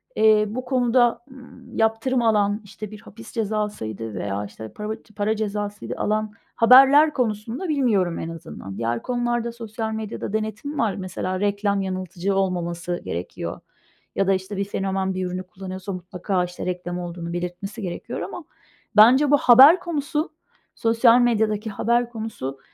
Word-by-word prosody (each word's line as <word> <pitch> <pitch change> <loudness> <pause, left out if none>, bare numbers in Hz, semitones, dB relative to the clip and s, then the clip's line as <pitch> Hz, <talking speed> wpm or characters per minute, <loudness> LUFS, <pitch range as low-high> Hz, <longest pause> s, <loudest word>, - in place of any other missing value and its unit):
eee, 215 -1 +5
bu 250 +4 -5
konuda, 245 -2 +2
ııı, 260 -1 -14
yaptırım 225 +3 +1
alan, 210 -2 +2
işte, 210 +1 -9
bir 215 0 -10
hapis 225 +2 -12
cezasıydı 205 - -3
veya, 100 0 -3
işte, 110 +2 -10
parav 210 +1 -4 0.2
para 210 +1 0
cezasıydı 210 -1 -3
alan 215 0 -1 0.2
haberler 270 +6 +7
konusunda, 235 - -2
bilmiyorum, 215 - +1
en 165 - -4
azından. 155 - -8
Diğer 115 +1 -1
konularda 240 -1 -1
sosyal 225 -1 -5
medyada 220 -1 -5
denetim 220 +7 -3
var. 220 -4 +1
Mesela, 185 0 -3
reklam 200 0 0
yanıltıcı 185 0 -2
olmaması 175 -2 -1
gerekiyor 85 +2 -5 0.6
ya 195 - +1
da, 195 - +4
işte, 190 +1 -3
bir 200 - 0
fenomen 195 -1 -2
bir 185 0 -2
ürünü 180 +1 -4
kullanıyorsa, 185 +1 -7
mutlaka, 180 +1 -2
işte, 180 0 -6
reklam 180 -1 -3
olduğunu 170 -1 -6
belirtmesi 180 +5 -5
gerekiyor. 180 -3 -5
Ama - - -6 0.5
bence 255 +7 +7
bu 290 - +7
haber 275 +7 +8
konusu, 310 -2 -2 0.4
sosyal 230 +1 +4
medyadaki 220 -2 +1
haber 235 +3 +1
konusu, 215 - -6
210 Hz, 145 wpm, -23 LUFS, 185-235 Hz, 0.6 s, haber